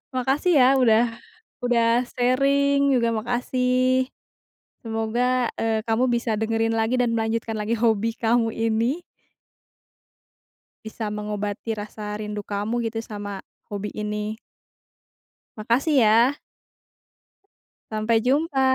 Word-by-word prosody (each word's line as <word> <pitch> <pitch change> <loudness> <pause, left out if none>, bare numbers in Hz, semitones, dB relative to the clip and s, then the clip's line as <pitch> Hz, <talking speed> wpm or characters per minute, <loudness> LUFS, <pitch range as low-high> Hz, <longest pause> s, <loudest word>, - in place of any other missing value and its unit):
Makasih 275 +5 +2
ya 255 +2 +6
udah 235 -2 +4 0.6
udah 235 0 +3
sharing 280 +2 +2
juga 235 -1 +1
makasih. 250 +2 0 0.7
Semoga, 235 +2 0
eee, 220 0 -1
kamu 225 +2 +2
bisa 235 -1 0
dengerin 225 +1 0
lagi 225 +3 +1
dan 240 -2 +1
melanjutkan 225 0 -1
lagi 215 +1 -2
hobi 225 0 +1
kamu 230 0 +2
ini. 230 +8 0 1.8
Bisa 220 -1 -5
mengobati 210 +1 -4
rasa 210 0 -6
rindu 210 -1 -5
kamu 210 +4 -2
gitu 225 - -7
sama 205 -2 -7 0.2
hobi 205 0 -5
ini. 210 0 -3 1.2
Makasih 240 +8 +1
ya. 230 +4 +5 1.6
Sampai 220 +1 +1
jumpa. 275 +1 +1
230 Hz, 100 wpm, -24 LUFS, 215-250 Hz, 1.8 s, ya